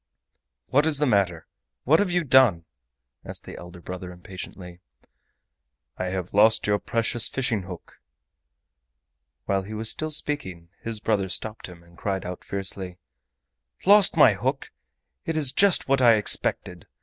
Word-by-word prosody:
"What 145 +4 +3
is 155 -3 +1
the 150 - +1
matter?—what 95 - -1
have 205 -2 +1
you 175 -1 0
done?" 125 - +4 0.6
asked - - -8
the - - -9
elder 90 0 -11
brother 90 +1 -8
impatiently. 90 0 -10 1.2
"I 90 - -4
have 90 -1 -4
lost 110 +2 +4
your 105 0 +1
precious 115 +2 0
fishing 125 -6 -1
hook—" 90 -3 -11 1.5
While 100 0 0
he 105 +3 -8
was 110 +1 +2
still 155 - -3
speaking 145 - -2
his 115 -1 -5
brother 105 -3 -1
stopped 110 +3 -3
him, 85 -2 -14
and 85 0 -21
cried 95 -2 -3
out 90 0 -7
fiercely: 95 -2 -5 0.9
"Lost 200 -3 +6
my 130 -8 +7
hook! 130 +7 -3 0.6
It 165 -1 -1
is 145 -5 +1
just 200 +2 +3
what 135 0 +2
I 120 -2 +6
expected. 90 -4 0
105 Hz, 145 wpm, -24 LUFS, 90-135 Hz, 1.5 s, my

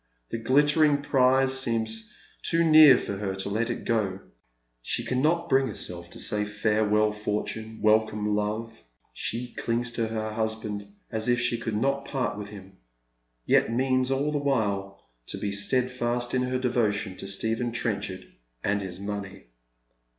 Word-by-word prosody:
The 115 - -3
glittering 145 +4 +3
prize 130 -1 +3
seems 110 -3 -1 0.3
too 165 0 +2
near 155 -5 +8
for 100 - -4
her 95 -1 -3
to 95 +1 -3
let 115 +4 -1
it 120 - -4
go. 100 -5 0 0.6
She - - -1
cannot 155 +7 +1
bring 135 -2 +3
herself 85 -6 -5
to - - -8
say 105 0 +1
farewell 105 0 +1
fortune, 105 +1 -4
welcome 105 -1 +2
love. 105 +2 -3 0.3
She 120 +2 -4
clings 120 +1 -1
to 115 -1 -1
her 110 -1 -3
husband 110 -2 -3 0.2
as 110 +1 -1
if 120 0 +3
she 120 -1 0
could 110 -2 -3
not 140 +4 0
part 130 -6 -2
with 105 -1 -7
him, 95 -2 -12 0.7
yet - - +3
means 130 +1 +1
all 140 +3 0
the 150 - 0
while 100 -8 -1 0.2
to - - -5
be 100 - -2
steadfast 120 +3 0
in 130 - +2
her 130 0 0
devotion 110 -6 0
to - - -6
Stephen 115 +4 -1
Trenchard 100 -5 -3 0.4
and 100 +1 +1
his 95 -2 -6
money. 100 -6 -6
110 Hz, 155 wpm, -27 LUFS, 105-130 Hz, 0.7 s, near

